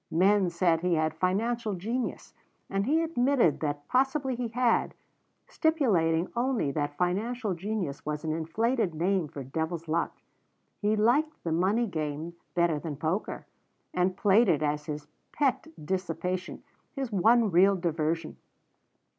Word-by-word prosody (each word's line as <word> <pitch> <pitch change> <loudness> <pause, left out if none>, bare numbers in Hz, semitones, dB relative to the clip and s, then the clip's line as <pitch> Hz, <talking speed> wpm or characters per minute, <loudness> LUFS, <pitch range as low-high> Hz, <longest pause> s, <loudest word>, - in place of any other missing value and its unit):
Men 190 +3 +3
said 170 -1 +2
he 180 -1 +2
had 155 0 +1
financial 210 +6 0
genius, 230 +8 -4 0.4
and 195 +2 0
he 320 +4 +3
admitted 255 - +2
that 145 -1 -3
possibly 265 +1 +1
he 245 0 -2
had, 240 +1 +1 0.5
stipulating 190 - +2
only 240 - 0
that 145 0 -3
financial 210 +5 -1
genius 180 -5 -3
was 150 0 -3
an 160 - -1
inflated 190 +4 0
name 180 +1 +1
for 140 -1 -7
devil's 160 +5 -3
luck. 160 +2 -1 0.6
He 210 +1 +2
liked 275 +9 +2
the 165 - -2
money 190 +8 +2
game 155 -3 -4 0.2
better 170 -3 +2
than 150 -2 -5
poker, 165 +7 -2 0.5
and 180 +1 +1
played 205 +2 +4
it 155 -3 +2
as 150 0 -1
his 150 -1 -5 0.3
pet 280 0 +1 0.2
dissipation, 185 +1 -3 0.3
his 270 -4 -3
one 220 +3 +4
real 190 +3 +5
diversion. 165 -2 -2
185 Hz, 140 wpm, -28 LUFS, 160-230 Hz, 0.6 s, real